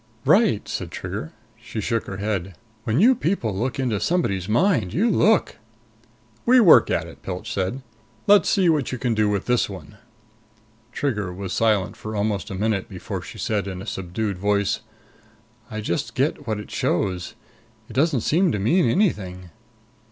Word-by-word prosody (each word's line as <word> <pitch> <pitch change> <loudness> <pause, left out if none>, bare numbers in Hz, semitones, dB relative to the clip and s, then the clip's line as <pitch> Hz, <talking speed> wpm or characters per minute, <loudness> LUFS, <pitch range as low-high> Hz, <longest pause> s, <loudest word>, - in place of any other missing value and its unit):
"Right," - - +3
said - - -4
Trigger. 80 - -6 0.3
She 110 - -6
shook 115 +2 -1
her 95 - -5
head. 100 -3 -3 0.3
"When 115 +5 +1
you 240 +7 +6
people 165 - -1
look 125 +7 -2
into 120 -6 0
somebody's 100 - 0
mind, 120 - +2
you 225 +6 +3
look!" 215 -1 +3 0.9
"We 255 +2 +6
work 195 -9 +7
at - - 0
it," - - -13
Pilch 95 +5 -5
said. 100 +8 -2 0.4
"Let's 200 -4 +5
see 190 -4 +3
what 155 -5 +2
you 130 - -3
can 120 -1 0
do 110 -1 +2
with 100 -2 -1
this 125 -3 +1
one." 100 +2 -10 0.9
Trigger 105 -10 -2
was 95 0 -5
silent 105 -3 +1
for 110 0 -7
almost 100 -3 -1
a 95 - -5
minute 105 0 -1
before - - -6
she - - -10
said 105 -2 -1
in 95 -2 -5
a 95 - -7
subdued 95 +1 -3
voice, 100 0 +1 0.9
"I 110 0 -5
just 105 +4 -3
get 135 0 -1
what 110 -1 -1
it 105 - -9
shows. 90 0 -1 0.5
It - - -11
doesn't 140 -2 +2
seem 175 - +2
to - - 0
mean 135 - +2
anything?" 95 - -1
110 Hz, 170 wpm, -23 LUFS, 95-140 Hz, 0.9 s, work